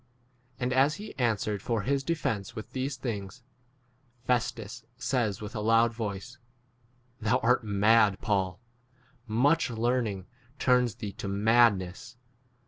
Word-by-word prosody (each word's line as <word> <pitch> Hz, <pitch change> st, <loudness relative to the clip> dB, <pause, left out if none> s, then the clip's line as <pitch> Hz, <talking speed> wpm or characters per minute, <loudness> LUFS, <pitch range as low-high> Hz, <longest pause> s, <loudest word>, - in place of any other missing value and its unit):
24 125 Hz, -, -6 dB
And 125 Hz, -, 0 dB
as 135 Hz, +4 st, +3 dB
he 210 Hz, +4 st, -9 dB
answered 105 Hz, -4 st, 0 dB
for 115 Hz, -2 st, -1 dB
his 135 Hz, +3 st, 0 dB
de 170 Hz, +4 st, 0 dB
fence 115 Hz, -6 st, -3 dB
with 110 Hz, -, -8 dB
these 130 Hz, +1 st, -3 dB
things, 115 Hz, -1 st, -5 dB, 0.8 s
Festus 120 Hz, -2 st, -1 dB
says 120 Hz, -5 st, -1 dB
with 105 Hz, +3 st, -7 dB
a -, -, -2 dB
loud 115 Hz, +2 st, +3 dB
voice, 115 Hz, +3 st, -5 dB, 0.8 s
Thou 110 Hz, -2 st, +2 dB
art 125 Hz, +1 st, +3 dB
mad, 105 Hz, -1 st, +3 dB
Paul; 95 Hz, -4 st, -1 dB, 0.7 s
much 140 Hz, +10 st, +2 dB
learning 115 Hz, -4 st, -1 dB, 0.3 s
turns 125 Hz, -5 st, +2 dB
25 -, -, -32 dB
thee 105 Hz, -, -5 dB
to -, -, -6 dB
madness. 105 Hz, 0 st, +2 dB
115 Hz, 135 wpm, -28 LUFS, 105-125 Hz, 0.8 s, as